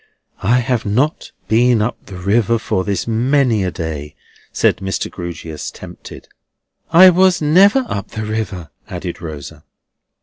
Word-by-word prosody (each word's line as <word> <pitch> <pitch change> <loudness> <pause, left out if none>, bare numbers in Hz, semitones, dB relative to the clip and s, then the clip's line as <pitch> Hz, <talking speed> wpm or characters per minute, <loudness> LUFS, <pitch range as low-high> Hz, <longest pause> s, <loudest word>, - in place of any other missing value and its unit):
"I 115 +6 +3
have 120 -2 -1
not 125 +9 -1 0.2
been 120 +1 +3
up 110 +3 -3
the 95 - -9
river 110 +5 +1
for 95 -4 -2
this 100 -1 -2
many 120 -1 +2
a 95 - 0
day," 75 -4 -6 0.4
said - - +2
Mr. 95 0 -3
Grewgious, 85 -3 -6
tempted. - - -11 0.6
"I 185 +2 +8
was 185 0 +3
never 195 - +4
up 100 - -4
the 110 0 -6
river," 100 -7 -4 0.2
added - - -6
Rosa. 75 -1 -8
110 Hz, 140 wpm, -17 LUFS, 90-130 Hz, 0.6 s, I